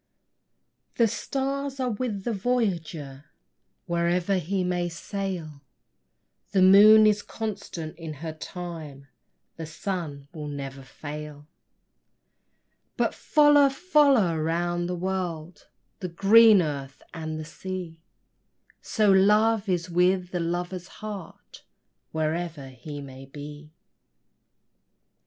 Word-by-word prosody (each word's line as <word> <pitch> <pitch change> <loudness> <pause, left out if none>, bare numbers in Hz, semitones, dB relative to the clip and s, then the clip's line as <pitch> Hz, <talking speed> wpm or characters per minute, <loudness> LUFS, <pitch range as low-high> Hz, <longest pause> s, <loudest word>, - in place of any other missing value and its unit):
The 230 - +4
stars 275 +4 -3
are 255 -2 0
with 215 -3 -3
the 235 - -1
voyager 170 - -2 0.6
Wherever 175 +2 +1
he 185 +3 -1
may 175 -1 -1
sail; 170 -4 -5 0.9
The 190 -2 +4
moon 210 +3 +8
is 210 -1 +3
constant 200 -9 -6
to 165 -2 -6
her 160 +2 -6
time; 155 -5 -8 0.5
The 165 -1 -6
sun 155 -4 -5
will 155 -3 -6
never 140 -2 -6
fail; 150 +2 -9 1.5
But - - +1
follow, 295 -2 +5
follow 275 - +3
round 175 +2 -1
the 180 - -2
world, 175 -2 -4 0.3
The 180 - -4
green 205 +3 +6
earth 140 -3 -5
and 160 -2 -5
the 155 - -6
sea, 175 0 -7 0.8
So 215 -3 +2
love 210 +2 +4
is 175 -1 0
with 180 +1 +1
the 180 - -2
lover's 175 +2 -3 0.2
heart, 205 -5 -9 0.5
Wherever 160 -2 -3
he 145 +2 -8
may 135 -1 -11
be. 150 +2 -10
175 Hz, 105 wpm, -26 LUFS, 155-200 Hz, 1.5 s, moon